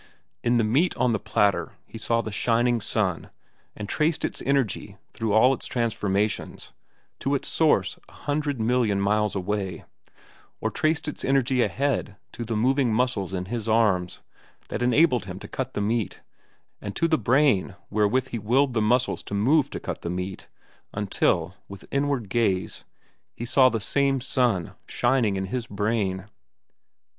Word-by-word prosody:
In 120 +1 +2
the 120 - +3
meat 140 +12 +2
on 125 - +2
the 110 - 0
platter 105 -2 +1
he 115 - -10
saw 115 +1 +1
the 110 - -6
shining 120 +3 +1
sun 100 -5 -1 0.5
and 105 - -6
traced 155 +6 0
its - - -4
energy 135 -6 0
back - - -23 0.2
through 110 -1 -2
all 125 +5 +6
its - - -5
transformations 105 -3 -1 0.5
to - - 0
its - - -3
source - - +2
a - - -19
hundred 145 -2 -2
million 110 -3 +2
miles 105 +1 +1
away, 95 0 -3 0.7
or - - -1
traced 155 +1 0
its 150 - -5
energy 130 -2 +2
ahead 140 -6 0 0.2
to 120 - -6
the 115 0 -3
moving 130 +2 +2
muscles 110 -5 0
in 90 0 -3
his 115 +2 -4
arms 105 -6 +2 0.5
that - - -3
enabled 125 - +3
him 90 -1 -7
to - - -9
cut 130 -1 -5
the - - -1
meat, 110 -1 -1 0.6
and 100 -1 -6
to 165 - +2
the 160 - +3
brain 120 -4 +2 0.2
wherewith 110 +5 +1
he 115 - -3
willed 125 +6 +2
the 110 - +1
muscles 120 +4 +1
to 100 - -6
move 135 +8 +3
to - - -5
cut - - -5
the 85 - -4
meat, 90 +2 -5 0.5
until, 90 -3 0
with 100 -1 -10
inward 140 -5 0
gaze, 95 -3 0 0.5
he 120 - -5
saw 130 +1 +5
the 115 -2 -2
same 135 +5 +1
sun 120 -8 0
shining 120 -5 +1
in 95 0 -2
his 115 +4 -4
brain. 100 -2 -1
115 Hz, 165 wpm, -25 LUFS, 100-130 Hz, 0.7 s, all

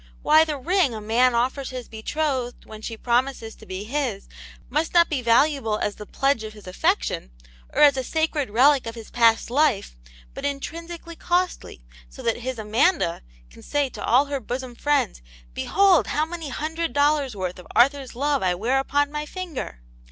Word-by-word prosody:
Why, 310 +1 +6
the 305 -2 -3
ring 320 - +1
a - - -5
man 235 +4 +2
offers 260 +3 0
his 255 -2 -7
betrothed 255 +2 -3
when 215 0 -11
she 225 0 -6
promises 240 -1 0
to 220 - -16
be 190 +1 -5
his 235 -4 -3 0.4
must 320 +3 -1
not 340 0 +6
be 290 -4 -1
valuable 235 -1 +2
as 210 - -2
the 210 - -10
pledge 275 -4 0
of 215 0 -7
his 210 -1 -14
affection, 60 - -1 0.4
or - - +3
as 285 -2 +7
a 260 - -1
sacred 315 -2 -1
relic 260 +4 +4
of 230 - -5
his 225 -2 -10
past 230 -1 +3
life, 255 - +1 0.4
but - - -8
intrinsically 335 +4 -5
costly, 355 - -2 0.3
so - - -11
that 230 - +1
his 255 +1 -4
Amanda 220 - +1 0.3
can - - -15
say 290 -2 0
to - - -8
all 255 +5 +4
her 280 -1 -3
bosom 255 0 -5
friends, 275 - 0 0.2
* - - -26
Behold 390 - +3
how 305 - 0
many 325 -2 -6
hundred 320 +4 -3
dollars* 285 -4 +2
worth 185 -2 -4
of 180 - -13
Arthur's 270 0 +3
love 285 +2 0
I 180 -1 +1
wear 240 +8 +1
upon 285 +1 0
my 300 0 -4
finger 335 - -6
260 Hz, 185 wpm, -24 LUFS, 225-295 Hz, 0.4 s, as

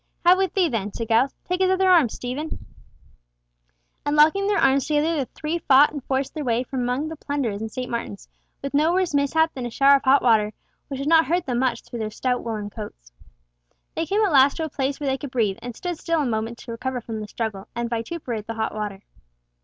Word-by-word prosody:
"Have 360 +2 +6
with 380 -3 0
thee 375 -3 +3
then," 215 -7 -2
said 230 +1 -5
Giles: 235 +4 +3
"Take 360 +1 -1
his 375 - +4
other 375 0 +2
arm, 340 -9 +5
Steve;" 250 +4 -5
and 315 +1 -5 1.6
locking 320 +7 +4
their 410 -1 +2
arms 270 0 +3
together 305 +2 +1
the 280 -4 -1
three 315 +2 -4
fought 280 -1 +5
and 290 -3 -6
forced 265 0 -1
their 310 - -4
way 240 -1 +1
from 260 +1 -5
among 250 +5 -1
the 320 - -6
plunderers 275 -9 -3
in 220 - -4
St. 255 +2 -5
Martin's 230 -4 -5 0.4
with 275 - -4
no 310 +4 +3
worse 370 -3 +1
mishap 305 +3 +2
than 250 -2 -4
a - - -5
shower 275 +4 +5
of - - -10
hot 270 +2 +4
water, 215 -3 +3 0.3
which 275 - -5
did 280 - -3
not 325 0 +5
hurt 350 +2 0
them 245 -2 -1
much 250 -3 0
through 240 - -8
their 215 -1 -2
stout 250 +3 -2
woollen 215 -3 -4
coats. - - -9 0.8
They 325 - -2
came 420 +5 +2
at 390 - 0
last 275 -1 +5
to 325 - -2
a - - -5
place 275 0 -2
where 290 - -3
they 265 0 0
could 285 - -6
breathe, 225 -5 0
and 245 -1 -7
stood 350 +2 -5
still 330 -3 0
a - - -1
moment 225 0 -2
to 235 - -9
recover 250 +2 -3
from 225 -2 -6
the 210 - -6
struggle, 210 -3 -4
and 235 0 -2
vituperate 230 -1 -4
the 230 - -4
hot 220 0 -2
water. 210 -2 -5
265 Hz, 235 wpm, -23 LUFS, 230-315 Hz, 1.6 s, Have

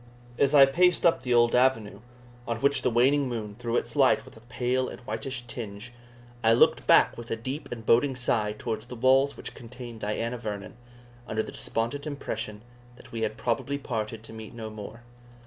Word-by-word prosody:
As 140 +1 +4
I 140 -1 +10
paced 175 +5 +3
up 170 - +4
the 125 -1 +1
old 120 0 +4
avenue, 120 -5 +2 0.5
on 115 - -1
which 140 +2 +2
the 125 - +2
waning 130 +4 +3
moon 110 -4 -4
threw 120 -1 -1
its - - -3
light - - +4
with - - -15
a - - -13
pale 125 +1 -1
and - - -9
whitish 120 +3 -5
tinge, 115 -1 -8 0.5
I 115 0 +5
looked 115 - +4
back - - +6
with 120 - -9
a - - 0
deep 130 +6 -6
and 115 -2 -6
boding 130 +4 +4
sigh 110 -4 0
towards 110 +1 -4
the 125 - -8
walls 135 +3 +3
which - - -8
contained 120 -1 -10
Diana 115 +3 -2
Vernon, 105 -3 -6 0.5
under 110 0 -1
the - - -8
despondent 120 +7 -3
impression 110 -7 -5 0.3
that - - -16
we 115 - -4
had 110 0 -2
probably 130 +4 -1
parted 110 -4 -4
to 115 - -11
meet 110 0 -9
no 110 -2 -6
more. 110 +2 -9
120 Hz, 195 wpm, -27 LUFS, 110-130 Hz, 0.5 s, I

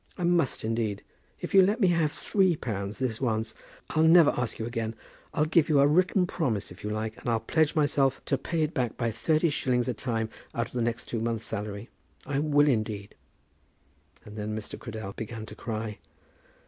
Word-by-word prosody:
I 180 - -3
must, 170 -5 +2
indeed. 110 -2 -1 0.4
If - - -5
you'll 190 -1 +8
let 210 +4 0
me 190 -5 +4
have 165 -3 +2
three 190 -1 +2
pounds 105 -6 -4
this 125 -3 -2
once, 110 -3 -1 0.4
I'll 155 - +2
never 160 -1 +7
ask 125 -2 -3
you 110 - -3
again. 115 -1 -3 0.4
I'll 150 - +1
give 160 0 +3
you 150 -2 +5
a 140 - +6
written 180 +5 +3
promise 120 - -2
if 90 - -12
you 105 - -2
like, 110 +1 -3
and - - -4
I'll 115 -1 +2
pledge 155 +8 +1
myself 140 -3 +2
to 140 - +1
pay 165 +3 -1
it 155 - -1
back 125 -6 -1
by 115 -2 0
thirty 155 +8 +1
shillings 125 -3 0
a 125 - 0
time 110 0 -2 0.3
out 115 - 0
of - - -13
the 125 - -2
two 115 - +1
next 115 0 -3
months' 115 -1 -1
salary. 105 +1 -5 0.4
I 140 -1 -1
will, 145 -1 +4
indeed." 110 -5 -1 1.1
And 105 +1 -10
then 105 +1 -3
Mr. 110 - -6
Cradell 110 -4 -6
began 110 0 -6
to 105 - -10
cry. 110 -2 -4
120 Hz, 200 wpm, -28 LUFS, 110-155 Hz, 1.1 s, you'll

